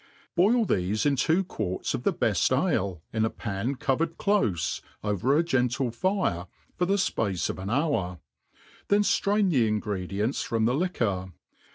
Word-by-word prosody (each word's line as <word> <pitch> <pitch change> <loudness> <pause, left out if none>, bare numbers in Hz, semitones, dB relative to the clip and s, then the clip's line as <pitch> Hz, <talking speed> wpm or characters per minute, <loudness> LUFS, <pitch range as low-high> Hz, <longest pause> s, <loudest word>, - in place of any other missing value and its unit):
Boil 220 +6 +4
thefe 100 - 0
in 145 -1 +3
two 160 +8 +2
quarts 100 - -3
of - - -2
the - - +2
bcft - - +1
ale, 90 -4 -1
in 110 0 +1
a 110 - +2
pan 110 +6 -3
covered 155 +5 -1
clofe, 105 - +1 0.2
over 105 +7 +1
a 165 - +3
gentle 130 -4 0
fire, 120 - -1 0.3
for 180 - 0
the 195 - +3
fpace 100 - 0
of - - -9
an 95 +1 -4
hour 115 - 0 0.4
\ - - -27
then 205 +1 +4
(irain 200 -1 +2
the 125 -7 +3
ingredients 105 +2 -1
froip 115 -1 0
the 120 - +2
liquor. 110 - -1
120 Hz, 165 wpm, -27 LUFS, -, 0.4 s, Boil